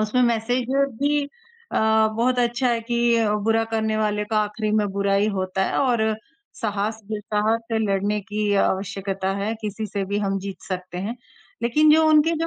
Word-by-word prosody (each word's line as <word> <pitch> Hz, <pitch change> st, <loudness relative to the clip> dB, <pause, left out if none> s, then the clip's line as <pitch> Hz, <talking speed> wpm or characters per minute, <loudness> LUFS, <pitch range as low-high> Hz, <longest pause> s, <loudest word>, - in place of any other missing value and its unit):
उसमें 215 Hz, +4 st, +2 dB
मैसेज 240 Hz, +1 st, +1 dB, 0.3 s
भी 290 Hz, 0 st, +2 dB, 0.5 s
अ, 220 Hz, 0 st, +3 dB
बहुत 250 Hz, +2 st, +1 dB
अच्छा 245 Hz, +1 st, +1 dB
है 235 Hz, -1 st, +1 dB
कि 235 Hz, 0 st, +3 dB, 0.3 s
बुरा 225 Hz, 0 st, +2 dB
करने 220 Hz, -1 st, 0 dB
वाले 210 Hz, -1 st, 0 dB
का 215 Hz, -, +2 dB
आखिरी 210 Hz, +1 st, -3 dB
में 210 Hz, -, +2 dB
बुरा 200 Hz, 0 st, +1 dB
ही 200 Hz, +2 st, +3 dB
होता 185 Hz, 0 st, -1 dB
है -, -, -1 dB
और 245 Hz, -5 st, +2 dB, 0.6 s
साहस 215 Hz, +1 st, -2 dB
जुटा 210 Hz, 0 st, -2 dB
ह 225 Hz, -, +4 dB, 0.2 s
के 225 Hz, -, +2 dB
लड़ने 205 Hz, 0 st, 0 dB
की 210 Hz, 0 st, -2 dB
आवश्यकता 195 Hz, 0 st, -2 dB
है, 205 Hz, +3 st, -2 dB
किसी 215 Hz, 0 st, -4 dB
से 200 Hz, -1 st, -3 dB
भी 200 Hz, +2 st, -2 dB
हम 195 Hz, -1 st, -1 dB
जीत 195 Hz, -2 st, -7 dB
सकते 185 Hz, -1 st, -5 dB
हैं। 215 Hz, +6 st, -4 dB, 0.5 s
लेकिन 300 Hz, +6 st, +4 dB
जो 320 Hz, 0 st, +5 dB
उनके 310 Hz, +1 st, +5 dB
जो 330 Hz, -, 0 dB
215 Hz, 185 wpm, -23 LUFS, 200-235 Hz, 0.6 s, जो